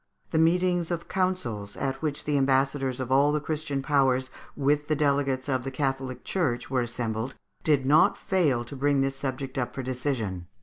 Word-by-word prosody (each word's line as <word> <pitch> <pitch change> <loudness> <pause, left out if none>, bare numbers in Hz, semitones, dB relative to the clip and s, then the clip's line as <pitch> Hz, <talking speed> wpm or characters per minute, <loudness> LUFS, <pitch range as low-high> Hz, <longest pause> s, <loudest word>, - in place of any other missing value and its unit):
The 160 - +2
meetings 175 +1 +2
of 170 -1 -3
councils, 125 - -2
at 135 0 -2
which 150 -2 -2
the 150 - 0
ambassadors 135 -1 +2
of 130 -1 -4
all 140 +2 +5
the 150 - +1
Christian 150 -2 -3
Powers, 130 -3 +2 0.2
with 145 +1 +1
the 155 - +2
delegates 140 -2 +1
of 130 -3 0
the 135 - -3
Catholic 135 -1 -2
Church, 140 -10 -1
were 130 -2 +2
assembled, 120 +1 -3 0.3
did 145 -4 +2
not 150 +3 +5
fail 150 -11 +1
to 130 - -8
bring 140 0 +2
this 135 0 0
subject 135 0 -4
up 125 - -3
for 135 - -3
decision. 120 - -3
135 Hz, 180 wpm, -27 LUFS, 130-150 Hz, 0.3 s, all